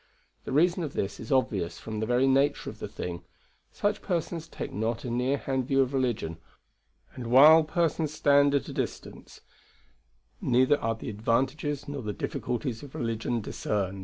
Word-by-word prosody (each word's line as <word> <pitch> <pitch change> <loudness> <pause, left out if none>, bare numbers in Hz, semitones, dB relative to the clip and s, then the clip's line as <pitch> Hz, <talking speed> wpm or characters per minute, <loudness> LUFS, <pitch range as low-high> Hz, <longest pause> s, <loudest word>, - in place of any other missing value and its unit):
The - - -5
reason 175 +6 +3
of 150 -4 -4
this 95 0 -3
is 115 - -8
obvious 95 -10 +1
from 110 +5 -6
the 110 - -2
very 125 +2 +3
nature 135 +2 +2
of - - -16
the - - -4
thing 85 0 -6 0.5
such 205 +1 -1
persons 170 -2 -3
take - - -6
not 110 +2 -2
a 120 - -3
near 125 +4 +1
hand 130 -2 -2
view 135 0 +3
of 130 +1 -5
religion, 120 -11 -1 0.7
and 125 -2 -7
while 150 +6 +8
persons 155 -1 0
stand 145 -2 +4
at 140 - 0
a - - -6
distance - - -6 1.0
neither 130 +4 +3
are 115 0 -1
the 110 - -6
advantages 135 +7 -1
nor 145 -1 -4
the 105 -3 -4
difficulties 120 +3 -3
of 140 -2 -11
religion 115 0 -2
discerned." 100 -2 -2
130 Hz, 170 wpm, -28 LUFS, 115-145 Hz, 1.0 s, while